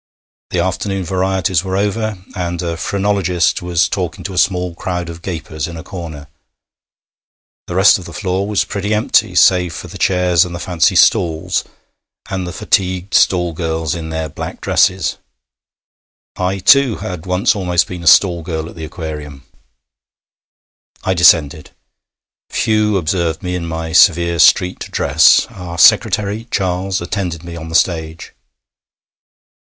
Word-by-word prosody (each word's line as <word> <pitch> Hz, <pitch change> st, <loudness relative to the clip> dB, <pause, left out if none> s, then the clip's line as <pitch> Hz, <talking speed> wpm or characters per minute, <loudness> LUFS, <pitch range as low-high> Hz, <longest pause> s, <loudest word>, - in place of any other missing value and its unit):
The -, -, -3 dB
afternoon 95 Hz, +2 st, -2 dB
varieties 95 Hz, -1 st, 0 dB
were 95 Hz, 0 st, -2 dB
over, 105 Hz, +1 st, -1 dB, 0.2 s
and 85 Hz, -2 st, -3 dB
a 85 Hz, -1 st, -3 dB
phrenologist 95 Hz, -2 st, 0 dB
was 90 Hz, -1 st, +1 dB
talking 90 Hz, -3 st, -4 dB
to 100 Hz, -, -5 dB
a -, -, -7 dB
small 90 Hz, -2 st, 0 dB
crowd 90 Hz, -1 st, -4 dB
of 85 Hz, 0 st, -9 dB
gapers 80 Hz, -4 st, -5 dB
in 85 Hz, 0 st, -8 dB
a 80 Hz, -, -8 dB
corner. 80 Hz, -6 st, -8 dB, 1.4 s
The 90 Hz, -, -5 dB
rest 95 Hz, +1 st, +5 dB
of 90 Hz, -, -11 dB
the -, -, -10 dB
floor 95 Hz, 0 st, -2 dB
was 105 Hz, -1 st, +1 dB
pretty 100 Hz, +1 st, -2 dB
empty 105 Hz, -2 st, +1 dB
save 90 Hz, -2 st, +3 dB
for -, -, -8 dB
the -, -, -10 dB
chairs 90 Hz, -2 st, +2 dB
and 90 Hz, -2 st, -6 dB
the -, -, -6 dB
fancy 90 Hz, +1 st, +1 dB
stalls, 90 Hz, -3 st, +2 dB, 0.7 s
and 95 Hz, -2 st, -3 dB
the -, -, -5 dB
fatigued 95 Hz, 0 st, -1 dB
stall 90 Hz, -2 st, +2 dB
girls 80 Hz, -1 st, -2 dB
in 80 Hz, -2 st, -6 dB
their 80 Hz, 0 st, -3 dB
black 75 Hz, -, -7 dB
dresses. -, -, +1 dB, 1.2 s
I 95 Hz, +1 st, -1 dB
too, 130 Hz, +4 st, +4 dB
had 90 Hz, -1 st, -7 dB
once 90 Hz, +7 st, +1 dB
almost 90 Hz, -3 st, +1 dB
been 90 Hz, -2 st, -8 dB
a 85 Hz, -, -5 dB
stall 85 Hz, 0 st, +5 dB
girl 80 Hz, -1 st, -4 dB
at -, -, -12 dB
the 80 Hz, -2 st, -7 dB
Aquarium! 75 Hz, -4 st, -8 dB, 1.6 s
I 95 Hz, -, +1 dB
descended. 80 Hz, -4 st, +3 dB, 0.8 s
Few 105 Hz, -2 st, +1 dB
observed 85 Hz, -2 st, -2 dB
me 90 Hz, -1 st, -3 dB
in 85 Hz, -2 st, -4 dB
my 80 Hz, 0 st, -5 dB
severe 85 Hz, -2 st, +4 dB
street 90 Hz, +3 st, +4 dB
dress. -, -, +4 dB
Our 90 Hz, -2 st, -8 dB
secretary, 105 Hz, +4 st, +3 dB
Charles, 95 Hz, -1 st, -1 dB
attended 90 Hz, -2 st, -4 dB
me 85 Hz, 0 st, -8 dB
on 80 Hz, -1 st, -8 dB
the 80 Hz, -, -5 dB
stage. 80 Hz, -1 st, -1 dB
90 Hz, 150 wpm, -16 LUFS, 85-95 Hz, 1.6 s, rest